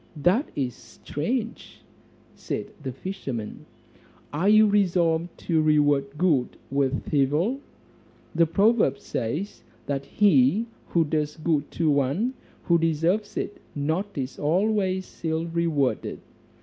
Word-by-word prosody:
"That 185 - +2
is 130 -4 -1
strange," 215 - -5 0.5
said - - -5
the 135 -2 -4
fisherman, 135 - -6 0.7
"are 175 +7 +2
you 215 +1 +7
resolved 175 -5 +1
to 160 -3 +1
reward 145 -2 +2
good 150 -8 +1
with 140 0 -1
evil? 150 - +2 0.7
The 165 0 +3
proverb 205 - +3
says, 150 - -4 0.2
'That 140 -1 -2
he 195 - +4 0.2
who 170 - +2
does 150 0 -1
good 155 -2 0
to 160 -3 +2
one 145 - +1 0.3
who 170 -2 +3
deserves 165 +6 0
it 205 - -4
not 160 +8 -2
is 130 -1 -4
always 190 +3 0
ill 160 0 0
rewarded.' 165 -5 -1
160 Hz, 115 wpm, -25 LUFS, 145-190 Hz, 0.7 s, you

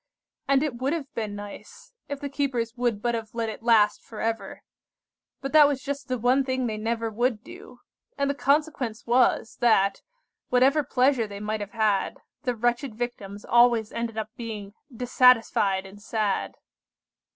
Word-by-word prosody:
And 275 0 +3
it 280 -6 -2
would 265 +4 -1
have 300 -5 -5
been 215 -3 -4
nice, 205 - -10 0.2
if 285 -1 -4
the 285 - -4
keepers 260 -5 -2
would 240 -4 -1
but 240 -1 +1
have 225 -1 -5
let 230 -1 -1
it 220 - -7
last 220 -3 +4
for 220 - -11
ever. 225 0 -3 0.8
But 275 - -4
that 300 -2 +8
was 275 -3 -2
just 280 -1 -4
the 255 -1 -1
one 250 +4 +3
thing 260 -1 -1
they 220 -2 -2
never 225 +1 -2
would 235 0 0
do, - - -13 0.4
and 280 - +1
the 280 - +1
consequence 275 -4 0
was, 240 -1 +2
that, 215 -5 +3 0.5
whatever 265 +4 +4
pleasure 255 -3 +2
they 200 -1 -8
might 215 +1 -3
have 205 0 -7
had, 215 -3 +1 0.2
the 250 -4 -1
wretched 240 +1 -1
Victims 210 -4 -5
always 235 -2 +4
ended 230 -1 -4
by 220 -1 -2
being 215 -4 -7 0.2
dissatisfied 230 -5 +3
and 200 +2 -13
sad. 215 -2 -1
235 Hz, 170 wpm, -26 LUFS, 215-260 Hz, 0.8 s, that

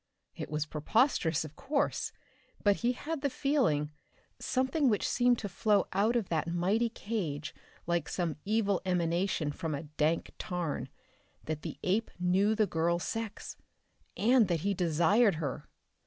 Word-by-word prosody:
It - - -6
was 150 0 -1
preposterous 160 - +1
of 155 0 -11
course, 280 +1 -1 0.5
but 205 -1 +4
he 240 +1 +1
had 300 +4 -4
the 285 - +1
feeling, 245 - +1 0.5
something 265 +2 +1
which 210 -3 +1
seemed 245 0 +3
to 205 - -4
flow 205 +2 +2
out 210 +5 +2
of 225 -6 0
that 160 -1 0
mighty 190 +8 +1
cage 170 -10 -4 0.3
like 170 -2 0
some 170 -4 -2
evil 205 -2 +1
emanation 175 -3 0
from 160 -1 -3
a 140 - -5
dank 155 +2 -1
tarn, 175 -4 -3 0.5
that 155 -1 -4
the - - -6
ape 210 +5 +1
knew 190 +4 +2
the 215 -1 +3
girl's 170 -1 0
sex 225 -2 -5 0.6
and 235 -1 +4
that 170 -3 0
he 200 +3 +1
desired 180 +5 +3
her! 150 -4 -4
190 Hz, 150 wpm, -31 LUFS, 160-225 Hz, 0.6 s, but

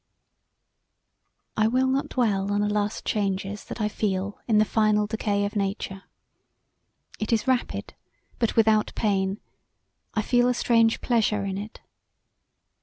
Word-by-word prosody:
I 215 0 +3
will 255 +3 +2
not 265 +1 0
dwell 200 -5 0
on 205 0 +1
the 210 - +1
last 210 0 -1
changes 200 0 -2
that - - -7
I 210 - +1
feel 200 -1 -2
in 220 -3 +3
the 215 - +5
final 215 -1 +2
decay 205 -1 -1
of 205 - -5
nature. 195 -1 -3 1.1
It 215 - -2
is 225 0 +1
rapid 255 -1 -1 0.5
but 230 -2 0
without 220 -1 +3
pain: 195 -1 0 0.8
I 215 - +1
feel 245 +1 +3
a 250 - +2
strange 230 -1 +3
pleasure 215 -4 +1
in 195 0 -3
it. 215 +2 -9
210 Hz, 140 wpm, -25 LUFS, 200-225 Hz, 1.1 s, the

